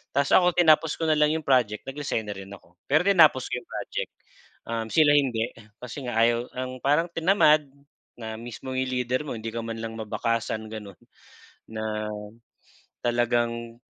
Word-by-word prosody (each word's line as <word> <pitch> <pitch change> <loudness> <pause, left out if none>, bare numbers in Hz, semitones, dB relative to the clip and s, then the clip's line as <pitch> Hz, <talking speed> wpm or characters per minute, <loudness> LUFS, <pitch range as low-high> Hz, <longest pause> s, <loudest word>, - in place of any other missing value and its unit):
'Tas 140 0 +1
ako, 180 -1 +5
tinapos 160 -2 +4
ko - - -2
na 155 - +4
lang 150 0 +4
'yong 160 - -3
project, 120 -6 +2
nag-resign 135 -4 -3
na - - -3
rin 95 0 -9
ako, 85 -3 -16
pero 155 +4 +3
tinapos 155 -9 +6
ko 125 - -1
'yong - - -21
project. - - -4 0.6
Um, 115 -1 -3
sila 155 -2 +5
hindi, 120 -5 +1 0.3
kasi 125 +2 -7
nga 120 - -3
ayaw 120 +1 +2
ang 130 0 -5
parang 150 +5 +3
tinamad 165 -3 +4 0.5
na 110 -1 -5
mismong 120 +3 -7
'yong 130 0 -1
leader 125 +1 0
mo - - -3
hindi 110 +1 -5
ka 115 - -3
man 115 0 -5
lang 115 0 -5
mabakasan 110 0 -2
gano'n. 105 -3 -8 0.8
Na 110 -1 -3 1.0
talagang 120 -1 0
120 Hz, 170 wpm, -26 LUFS, 115-145 Hz, 1.0 s, tinapos